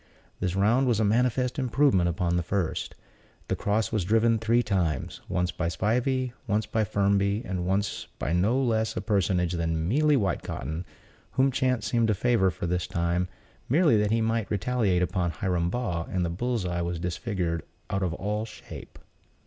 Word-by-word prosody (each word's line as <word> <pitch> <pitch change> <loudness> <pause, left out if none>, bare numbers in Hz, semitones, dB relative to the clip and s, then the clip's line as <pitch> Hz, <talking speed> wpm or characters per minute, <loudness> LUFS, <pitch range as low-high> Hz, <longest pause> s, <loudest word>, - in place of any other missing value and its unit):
This 90 0 -1
round 115 +7 +3
was 115 -3 +2
a - - +3
manifest 125 +4 +1
improvement 125 -8 +3
upon 85 +1 0
the 90 - +2
first. 90 0 -2 0.5
The - - +1
cross 105 +2 0
was 110 -5 0
driven 115 +4 +3
three 115 +2 +2
times: 85 - -1
once 90 0 0
by 90 - -2
Spivey, 125 +8 0
once 105 0 +1
by 110 +1 0
Firmby, 100 +2 +1
and 90 -1 -3
once 100 +2 -1
by 80 - -2
no 105 +9 +2
less 110 -4 0
a - - 0
personage 90 -4 +1
than 80 -1 -1
Mealy 150 - +3
Whitecotton, 85 - -2 0.5
whom 135 +1 +3
chance 125 -4 0
seemed 115 0 +2
to 110 - +2
favor 110 -2 +3
for 85 - -5
this 90 0 -1
time, 85 +1 0 0.4
merely 150 -1 +4
that 105 -1 +2
he 115 +1 +2
might 115 -1 0
retaliate 105 -3 +1
upon 90 -1 0
Hiram 85 0 -1
Baugh; 90 -7 -2
and 90 -1 0
the 85 - -2
bull's 115 +2 -1
eye 85 -1 -1
was 85 0 -2
disfigured 85 -1 -2 0.3
out 95 - 0
of 90 -3 -1
all 105 +3 -2
shape. 110 - -11
100 Hz, 175 wpm, -27 LUFS, 90-115 Hz, 0.5 s, merely